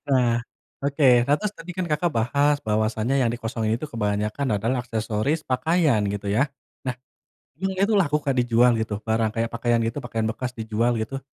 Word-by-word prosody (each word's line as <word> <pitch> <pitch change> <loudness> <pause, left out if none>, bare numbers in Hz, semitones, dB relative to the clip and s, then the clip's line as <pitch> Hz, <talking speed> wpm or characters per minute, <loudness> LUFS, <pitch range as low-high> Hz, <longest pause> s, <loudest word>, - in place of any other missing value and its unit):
Wah, 125 -4 +3 0.5
oke. 140 +1 +1 0.2
Nah, 145 - +4
terus 210 -1 -2
tadi 165 +2 -8
kan 185 - -1
Kakak 150 +3 +1
bahas 140 +6 +2
bahwasanya 110 +3 0
yang 120 -3 +2
dikosongin 115 -2 -2
itu 140 - -6
kebanyakan 105 +4 -1
adalah 115 +5 0
aksesoris 110 +6 -1
pakaian 155 -2 +2
gitu 105 0 -5
ya. 130 - +4 0.4
Nah, 130 -1 -1 0.6
emang 190 +3 -1
itu 200 +3 +3
laku 150 -4 +1
Kak 135 -2 +1
dijual 120 0 +4
gitu? 110 -1 -2
Barang 110 -1 +1
kayak 115 0 0
pakaian 120 0 +1
gitu, 115 - -4
pakaian 115 -2 -2
bekas 125 +2 -4
dijual 110 +2 0
gitu? 135 +5 -5
120 Hz, 175 wpm, -24 LUFS, 110-140 Hz, 0.6 s, Nah